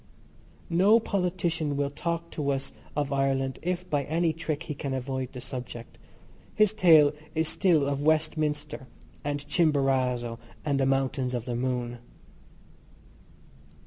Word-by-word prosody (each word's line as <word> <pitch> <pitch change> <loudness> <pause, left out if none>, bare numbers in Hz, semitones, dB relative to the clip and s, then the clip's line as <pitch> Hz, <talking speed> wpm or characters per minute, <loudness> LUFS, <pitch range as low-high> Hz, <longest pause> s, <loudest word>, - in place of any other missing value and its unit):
No 195 +7 +6
politician 175 -7 -1
will 140 0 0
talk 170 +3 -3
to 145 -2 -2
us 135 -1 -2 0.2
of 145 -1 -1
Ireland 135 -1 0
if 180 +1 -2
by 145 -5 +1
any 165 +1 +1
trick 160 -1 -3
he 150 - -4
can 140 -1 -3
avoid 130 0 -3
the 125 - -8
subject. 125 -2 -8 0.6
His 215 -1 +4
tale 160 -8 +6 0.2
is 160 0 +1
still 165 -7 +3
of 140 0 -1
Westminster 150 -2 0 0.4
and 145 0 -3
Chimborazo 130 -7 +1 0.3
and 140 -2 +1
the 135 - +2
Mountains 135 -1 0
of 120 -1 -3
the 120 -1 -3
Moon. 120 -1 -2
145 Hz, 135 wpm, -28 LUFS, 135-165 Hz, 0.6 s, No